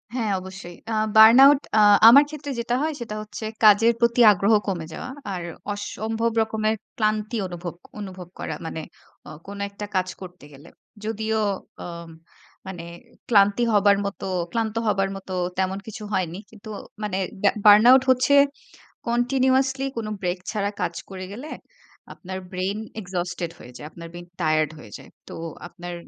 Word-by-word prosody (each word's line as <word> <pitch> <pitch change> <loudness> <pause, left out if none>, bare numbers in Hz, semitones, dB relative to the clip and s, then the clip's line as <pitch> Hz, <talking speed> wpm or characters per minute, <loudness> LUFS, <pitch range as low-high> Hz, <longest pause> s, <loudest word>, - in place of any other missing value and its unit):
হ্যাঁ, 225 -5 -1
অবশ্যই। 185 -1 -10 0.2
আ - - -1 0.2
burn 220 +2 +9
out 280 0 +6 0.2
আ - - +6 0.3
আমার 275 +5 +8
ক্ষেত্রে 295 -2 -7
যেটা 240 +1 -1
হয় 315 +1 -1
সেটা 225 -3 -5
হচ্ছে 215 +1 -9 0.2
কাজের 215 +2 +6
প্রতি 235 0 +3
আগ্রহ 200 +3 +2
কমে 175 -5 -2
যাওয়া। 250 - -7 0.2
আর 180 - -4 0.3
অসম্ভব 220 +3 -3
রকমের 220 0 0 0.2
ক্লান্তি 215 +1 0
অনুভব 175 -1 -6 0.3
অনুভব 185 -3 -8
করা। 160 - -4
মানে 160 0 -5 0.5
ও - - -9 0.2
কোন 200 0 -8
একটা 205 +1 -7
কাজ 185 0 +1
করতে 180 -4 -11
গেলে। 145 +5 -15 0.4
যদিও 220 0 -1 0.4
ও - - -7 0.8
মানে 180 -3 -7 0.5
ক্লান্তি 205 +1 +4
হবার 205 -1 +4
মত 200 - -5 0.3
ক্লান্ত 225 -2 -2
হবার 195 -2 +1
মত 195 0 -11 0.3
তেমন 190 0 0
কিছু 220 0 -8
হয়নি। 180 -2 -1
কিন্তু 215 -1 -13 0.3
মানে 200 -3 -2 0.3
ব্যা 200 - +5
বার্ন 210 +2 +8
আউট 260 0 +6
হচ্ছে 255 +2 +2 0.8
কন্টিনিউয়াসলি 265 +2 +1
কোন 225 -2 -3
ব্রেক 180 0 -2
ছাড়া 205 -2 -1
কাজ 175 -1 -1 0.2
করে 185 -1 -7
গেলে 260 +9 -8 0.6
আপনার 185 0 -7
ব্রেইন 190 +3 -2 0.2
এক্সজোস্টেড 180 -2 -4
হয়ে 125 - -13
যায়। 150 - -9
আপনার 170 0 -10
ব্রেইন 175 0 -10
টায়ার্ড 155 -1 +1
হয়ে 110 -7 -13
যায়। - - -15 0.2
তো - - -9 0.3
আপনার 175 0 -8
205 Hz, 155 wpm, -23 LUFS, 185-230 Hz, 0.8 s, বার্ন